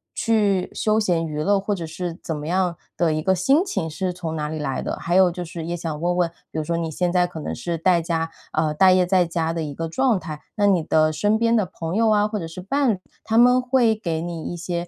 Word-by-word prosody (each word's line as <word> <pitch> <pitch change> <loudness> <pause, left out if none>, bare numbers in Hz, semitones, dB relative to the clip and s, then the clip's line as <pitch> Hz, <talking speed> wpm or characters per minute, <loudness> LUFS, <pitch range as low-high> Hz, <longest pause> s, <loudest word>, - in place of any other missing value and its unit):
去 205 -5 +1
休 215 0 +1
闲 175 -6 +1
娱 150 -1 -3
乐， 200 0 +3
或 200 +1 -2
者 170 -3 -5
是 170 +2 -5
怎 160 - -3
么 150 - -6
样 180 0 +1 0.2
的 170 -2 +2
一 155 - -1
个 190 +3 +2
心 270 - +3
情 170 - -2
是 180 +4 -2
从 165 -3 -5
哪 150 -1 -3
里 155 - -4
来 135 -3 -2
的？ - - -3
还 175 - -1
有 185 -1 +6
就 180 0 -5
是 165 -1 -7
也 170 +1 -3
想 160 -3 -4
问 175 +1 0
问， 175 -2 +2 0.2
比 - - -6
如 - - -1
说 170 +2 -2
你 165 -1 -2
现 175 +3 0
在 180 -1 +3
可 175 -2 -8
能 - - -4
是 170 +7 -3
待 170 +1 +3
家 165 -1 -1 0.2
呃， 155 -1 +1
待 185 +4 +5
业 185 -1 +4
在 180 -1 +3
家 165 -1 -1
的 165 -1 -2
一 145 -2 -5
个 165 +3 -4
状 245 +3 +1
态， 155 -3 -7
那 205 - +2
你 180 -5 +3
的 155 0 +3
身 205 +8 +2
边 230 0 +3
的 215 - +2
朋 165 -1 -5
友 225 +1 +3
啊 210 -1 +3
或 215 0 -3
者 165 - -5
是 165 +3 -8
伴 270 +6 +1
侣， 185 - -6 0.2
他 220 +1 0
们 250 +1 +6
会 250 -3 +3
给 165 -7 -3
你 170 -1 -5
一 - - -6
些， 170 0 -3
175 Hz, 290 characters per minute, -22 LUFS, 160-200 Hz, 0.2 s, 有